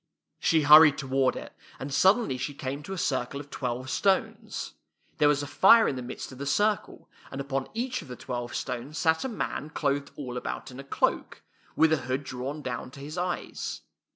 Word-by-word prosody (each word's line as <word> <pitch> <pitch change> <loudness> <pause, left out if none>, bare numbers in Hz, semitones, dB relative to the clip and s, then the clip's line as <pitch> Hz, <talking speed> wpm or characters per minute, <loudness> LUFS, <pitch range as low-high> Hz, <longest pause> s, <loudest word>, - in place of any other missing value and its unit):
She 160 -2 +3
hur 150 +2 +10
ried 150 -3 +5
toward 135 -1 +1
it, - - -8 0.2
and 135 +1 -6
suddenly 195 - +4
she 140 +2 -4
came 135 +1 -4
to 190 +6 -7
a - - -5
circle 135 -3 -1
of 145 0 -11
twelve 125 0 -3
stones. 195 -2 0 0.5
There 150 - +5
was 145 -1 +2
a - - -3
fire 190 - +6
in 140 - -1
the 130 - -4
midst 125 +2 -7
of 130 - -11
the 140 - -4
circle, 210 +7 0 0.2
and 135 - -7
upon 135 -1 -2
each 250 +2 -2
of - - -12
the 125 - -7
twelve 120 0 -5
stones 130 +4 -4
sat 160 0 +2
a 265 - -2
man 180 - -4
clothed 140 -2 -1
all 125 -4 -5
about 125 - -5
in 125 - -10
a - - -7
cloak, 140 - -1 0.3
with 160 0 +4
a - - +3
hood 130 +1 -3
drawn 135 +4 -5
down 125 -1 -4
to 135 - -13
his 145 +3 -7
eyes. 180 0 -3
140 Hz, 210 wpm, -28 LUFS, 130-160 Hz, 0.5 s, hur